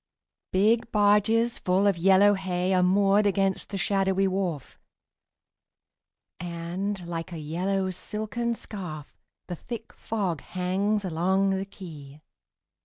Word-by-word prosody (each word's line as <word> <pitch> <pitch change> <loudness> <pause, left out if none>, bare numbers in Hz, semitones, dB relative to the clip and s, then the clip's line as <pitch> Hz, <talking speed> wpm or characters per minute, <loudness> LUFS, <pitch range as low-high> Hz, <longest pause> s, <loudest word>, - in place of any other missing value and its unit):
Big 225 +5 +2
barges 210 +3 +3
full 185 +2 +2
of 200 -2 +4
yellow 195 +4 +5
hay 185 -1 -1
Are 185 - +4
moored 200 +3 +4
against 195 -1 0
the 200 - -4
shadowy 195 +1 +1
wharf, 185 -7 -3 1.6
And, 175 +3 -4
like 170 +1 -5
a 170 - -5
yellow 185 +5 -1
silken 220 +5 -3
scarf, 175 -10 -8 0.3
The 175 - -5
thick 225 +6 -8
fog 190 -9 -3
hangs 195 +3 -1
along 190 +3 +1
the 190 0 -1
quay. 155 -7 -11
190 Hz, 115 wpm, -26 LUFS, 175-205 Hz, 1.6 s, yellow